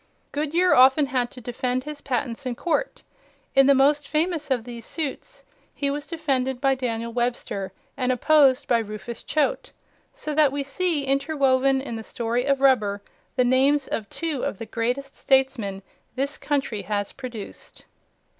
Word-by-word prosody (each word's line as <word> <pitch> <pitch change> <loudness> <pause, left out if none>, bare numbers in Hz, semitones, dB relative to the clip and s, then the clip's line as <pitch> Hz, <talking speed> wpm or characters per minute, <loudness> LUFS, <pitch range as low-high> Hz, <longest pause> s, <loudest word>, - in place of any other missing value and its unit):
Goodyear 320 +5 +2
often 265 +3 +6
had 255 -3 -1
to 250 - -12
defend 250 +2 -2
his 300 0 -7
patents 245 -2 -2
in 245 - -2
court. 430 - -2 0.5
In 270 -1 +6
the 280 - +6
most 285 +2 +3
famous 320 -1 0
of 250 -4 +1
these 235 -1 -8
suits, 295 +2 -5 0.3
he 280 -1 0
was 290 +1 -4
defended 265 -6 -1
by 270 0 +3
Daniel 235 -3 -3
Webster 240 -5 -2 0.2
and 255 -1 0
opposed 275 0 +4
by 235 - +3
Rufus 220 +2 -6
Choate, - - -1 0.4
so 305 -12 -5
that 295 -2 +4
we 280 0 -2
see 300 +1 -1
interwoven 275 -1 +2
in 235 -4 -5
the 225 - -6
story 235 +2 -2
of 275 -1 +1
rubber 210 -7 +3 0.3
the 250 - +3
names 270 +3 +3
of 210 -3 -3
two 320 -6 -3
of - - -2
the 225 - -6
greatest 245 +5 -2
statesmen 265 -8 +1 0.3
this 280 +3 -1
country 270 -8 -1
has 205 -1 -2
produced. 245 -6 -9
265 Hz, 160 wpm, -24 LUFS, 240-285 Hz, 0.5 s, often